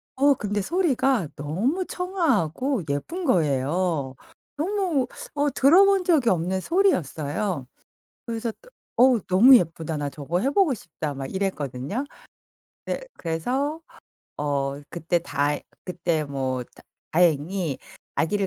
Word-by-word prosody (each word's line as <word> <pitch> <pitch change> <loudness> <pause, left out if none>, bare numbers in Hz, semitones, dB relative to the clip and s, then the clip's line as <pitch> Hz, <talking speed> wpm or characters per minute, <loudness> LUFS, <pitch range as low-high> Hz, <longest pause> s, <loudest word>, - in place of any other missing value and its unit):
어 280 +1 +4
근데 205 -3 -2
소리가 270 - +1
너무 215 - -1
청아하고 275 - 0
예쁜 330 - -3
거예요. 155 - +1 0.4
너무 345 -5 0 0.3
어 290 0 +1
들어 290 +9 +6
본 395 -1 +3
적이 310 -9 +3
없는 185 +1 0
소리였어요. 180 - 0 0.6
그래서 230 0 -3
또 - - -18 0.3
'어우 250 -2 +5
너무 230 +9 +8
예쁘다. 165 -3 -3
나 145 -1 -2
저거 150 +5 -3
해 265 - +2
보고 315 0 +3
싶다.' 155 - -5
막 135 -1 -6
이랬거든요? 185 - -2 0.8
네 - - -3
그래서 255 - -2 0.6
어 140 -1 -1
그때 170 +1 0
다 145 -3 0 0.3
그때 170 -3 -1
뭐 130 -3 -2
다 - - -20 0.3
다행히 165 -1 +1 0.4
아기를 200 +4 +1
190 Hz, 245 characters per minute, -25 LUFS, -, 0.8 s, 너무